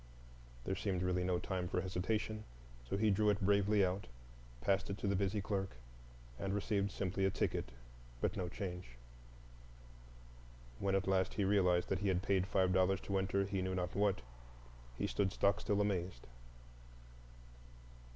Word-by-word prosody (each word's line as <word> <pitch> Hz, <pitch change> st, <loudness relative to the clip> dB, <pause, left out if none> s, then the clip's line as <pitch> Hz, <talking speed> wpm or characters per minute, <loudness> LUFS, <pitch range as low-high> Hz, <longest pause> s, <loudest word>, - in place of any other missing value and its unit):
There 95 Hz, -, 0 dB
seemed 95 Hz, -2 st, -1 dB
really 90 Hz, 0 st, +1 dB
no 90 Hz, 0 st, +1 dB
time 90 Hz, 0 st, -2 dB
for -, -, 0 dB
hesitation, 105 Hz, +4 st, -2 dB, 0.5 s
so -, -, 0 dB
he 110 Hz, 0 st, +3 dB
drew 105 Hz, +2 st, +3 dB
it 100 Hz, -1 st, +2 dB
bravely 100 Hz, +1 st, +4 dB
out, 95 Hz, +1 st, -2 dB, 0.5 s
passed 95 Hz, +10 st, +1 dB
it 100 Hz, -, -3 dB
to 105 Hz, -, -3 dB
the 100 Hz, -, +2 dB
busy 100 Hz, +2 st, 0 dB
clerk, 95 Hz, -, -2 dB, 0.6 s
and 100 Hz, 0 st, -1 dB
received 100 Hz, -1 st, 0 dB
simply 95 Hz, 0 st, -1 dB
a 95 Hz, -, +4 dB
ticket -, -, -1 dB, 0.5 s
but -, -, 0 dB
no 90 Hz, -1 st, -2 dB
change. 90 Hz, -, -6 dB, 1.8 s
When 95 Hz, -1 st, +1 dB
at 95 Hz, -, +1 dB
last 95 Hz, -1 st, +2 dB
he 105 Hz, -, +1 dB
realized 90 Hz, -3 st, +3 dB
that 95 Hz, -, +1 dB
he 100 Hz, -, -1 dB
had 95 Hz, -1 st, +1 dB
paid 95 Hz, -2 st, +2 dB
five 95 Hz, -2 st, +2 dB
dollars 95 Hz, +1 st, +3 dB
to 100 Hz, -1 st, 0 dB
enter 95 Hz, +1 st, +1 dB
he 95 Hz, -1 st, -2 dB
knew 95 Hz, 0 st, -1 dB
not 90 Hz, -1 st, -2 dB
what, 100 Hz, -9 st, +1 dB, 0.7 s
he -, -, 0 dB
stood 100 Hz, -2 st, 0 dB
stockstill 100 Hz, +1 st, +2 dB
amazed. 90 Hz, -9 st, -1 dB
95 Hz, 160 wpm, -36 LUFS, 90-100 Hz, 1.8 s, bravely